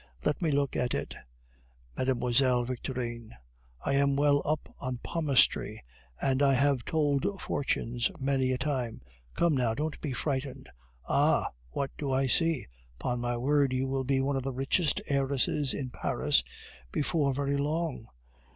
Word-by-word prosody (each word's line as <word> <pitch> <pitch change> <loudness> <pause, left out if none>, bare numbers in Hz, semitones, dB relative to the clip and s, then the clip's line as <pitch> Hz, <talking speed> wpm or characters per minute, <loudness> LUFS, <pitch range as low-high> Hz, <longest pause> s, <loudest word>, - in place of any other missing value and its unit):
Let 150 - +1
me 165 - +2
look 140 -1 +1
at 125 -1 0
it, - - -3 0.8
Mlle. 125 -1 +2
Victorine; 120 - -4 0.5
I 140 - +1
am 140 0 +3
well 145 0 +4
up 155 0 -1
in 130 -2 -2
palmistry, 140 - +1 0.4
and 135 0 +1
I 135 -1 +5
have 140 -1 +2
told 160 +5 +1
fortunes 120 -3 -1
many 135 -1 +1
a 130 - +1
time. 130 - -2 0.3
Come, 170 -3 +3
now, 120 -4 +1
don't 150 +2 -3
be 145 - -3
frightened. 135 +1 -3 0.4
Ah! - - +3 0.2
what 135 - -2
do 140 -2 -2
I 135 +1 +2
see? 165 +1 +2 0.3
Upon 125 -1 -1
my 120 0 -1
word, 140 +1 +2
you 130 +1 +1
will 135 0 -1
be 135 +1 +1
one 140 +1 0
of 135 - 0
the 135 +1 -3
richest 135 +5 +1
heiresses 140 0 +1
in 130 -3 -4
Paris 60 - +1 0.5
before 150 -2 +1
very 140 0 0
long. 150 -3 -2
135 Hz, 150 wpm, -29 LUFS, 125-145 Hz, 0.8 s, I